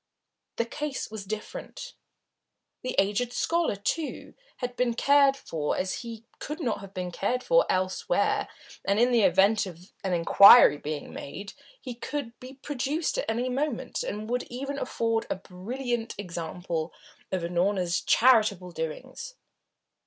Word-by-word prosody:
The 230 - 0
case 295 0 -4
was 215 -2 -6
different. 215 - -7 0.9
The 255 - -4
aged 210 +5 +1
scholar, 335 -9 +1
too, 295 - -3 0.2
had 250 -1 -4
been 245 -2 0
cared 280 +1 +4
for 155 - -3
as 185 0 -2
he 230 -1 -8
could 300 +3 -5
not 250 -9 -1
have 195 -1 -10
been 180 -2 -4
cared 245 +8 -1
for - - +4
elsewhere, 185 - 0 0.4
and, 200 +2 +1
in 245 +2 +4
the 235 -2 +4
event 195 +3 +4
of 175 +1 -12
an 190 -2 -1
inquiry 185 +1 +8
being 150 -1 -5
made, 200 +8 -7 0.3
he 255 - -6
could 245 0 -5
be 255 +1 -10
produced 285 +3 -2
at - - -3
any 235 +3 0
moment, 265 0 -2
and 210 +1 -4
would 245 +2 0
even 275 +3 -4
afford 230 -1 -1
a - - 0
brilliant 230 +6 -4
example 170 -3 -4 0.4
of 185 -2 -1
Unorna's 180 +1 0
charitable 215 -7 +4
doings. 260 - -6
225 Hz, 145 wpm, -27 LUFS, 185-255 Hz, 0.9 s, inquiry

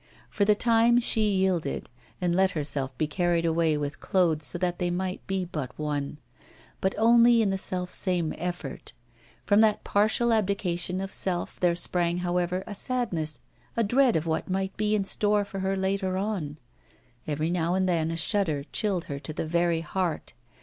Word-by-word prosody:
For 205 - +1
the 210 0 +4
time 235 +2 +4
she 220 -3 +4
yielded, 185 -7 0 0.3
and 175 -1 0
let 190 +1 +4
herself 140 -3 -2
be 155 - +1
carried 170 +1 0
away 165 -2 +2
with 145 0 -4
Claude, 170 -5 +1
so 155 +4 0
that 175 0 -1
they 175 - 0
might 185 +1 -3
be 190 -1 -1
but 150 -7 -6
one 145 -1 -3 0.6
one 190 - +2
only 235 +1 +5
in 200 - +1
the 195 - -1
self 180 -1 -3
same 175 -4 -1
effort. 175 -5 -4 0.5
From 205 +1 +4
that 215 -2 +3
partial 220 +3 +2
abdication 185 -3 -1
of 195 0 -5
self 180 -2 -1
there 175 -1 +2
sprang, 175 0 +1
however, 180 +1 -1
a - - -7
sadness, 195 -10 -2 0.4
a 230 - +3
dread 245 +3 +3
of 160 0 0
what 160 +2 -2
might 190 +1 -2
be 215 0 +1
in 205 - +1
store 205 +1 +1
for 195 -1 -7
her 190 0 -1
later 190 -1 -1
on. 190 -8 -3 0.7
Every 155 +2 -1
now 175 0 0
and 190 0 +1
then 165 -3 +1
a 165 - -3
shudder 165 -4 0
chilled 195 -5 0
her 140 -1 -5
to 155 +2 -7
the - - -3
very 170 0 +1
heart. 175 -2 -3
180 Hz, 180 wpm, -27 LUFS, 165-200 Hz, 0.7 s, only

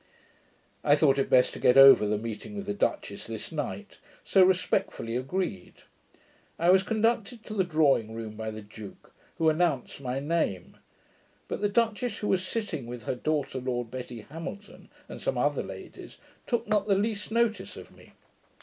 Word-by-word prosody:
I 145 - +5
thought 140 -2 +3
it 135 - 0
best 125 -1 +4
to - - -7
get 125 - +4
over 135 -6 +9
the 105 0 +1
meeting 115 - -6
with 200 -1 -5
the 205 - -2
duchess 205 - -2
this - - -6
night; - - -5 0.2
so 195 - +4
respectfully 180 -10 0
agreed. 130 - -4 0.7
I 170 +2 +4
was 190 0 +6
conducted 225 +2 0
to 215 - -8
the 195 -3 +2
drawing 145 -10 +2
room 110 -1 -6
by 110 0 -4
the 110 0 -7
duke, 105 0 -12 0.2
who 165 - +2
announced 155 -5 0
my 130 0 -2
name; 145 - -2 0.7
but - - -4
the 205 - +2
duchess, 225 +1 0
who 210 - -3
was 185 -1 +2
sitting 185 - -4
with 120 -1 -7
her - - -2
daughter, 145 +1 -2
Lady 125 -1 -2
Betty 120 -1 -8
Hamilton, 165 - -9 0.2
and - - -9
some - - -1
other - - +1
ladies, - - -10 0.3
took 235 -2 -1
not 210 -1 +1
the 200 - +4
least 205 +1 -1
notice 230 0 0
of - - -12
me. - - -18
160 Hz, 175 wpm, -28 LUFS, 125-205 Hz, 0.7 s, over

